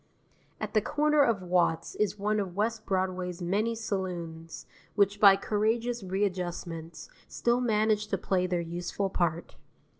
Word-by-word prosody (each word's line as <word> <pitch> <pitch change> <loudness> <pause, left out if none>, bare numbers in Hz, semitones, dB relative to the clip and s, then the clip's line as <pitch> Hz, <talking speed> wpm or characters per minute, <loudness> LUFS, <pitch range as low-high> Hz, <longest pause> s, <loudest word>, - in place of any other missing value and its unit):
At - - -4
the 215 - +4
corner 300 +5 +2
of 230 -8 +2
Watts 175 -2 +1
is 210 -1 -1
one 210 +1 0
of 190 -3 -4
West 220 +2 -1
Broadway's 185 -2 -1
many 205 +6 0
saloons, 175 -6 -5 0.3
which 205 0 +2
by 200 -2 +8
courageous 225 +4 0
readjustments 180 -4 -3 0.2
still 240 +1 0
manage 215 -2 +1
to 195 - -1
play 185 0 0
their 180 -1 0
useful 175 +3 -3
part. 170 -2 -1
195 Hz, 140 wpm, -29 LUFS, 180-215 Hz, 0.3 s, by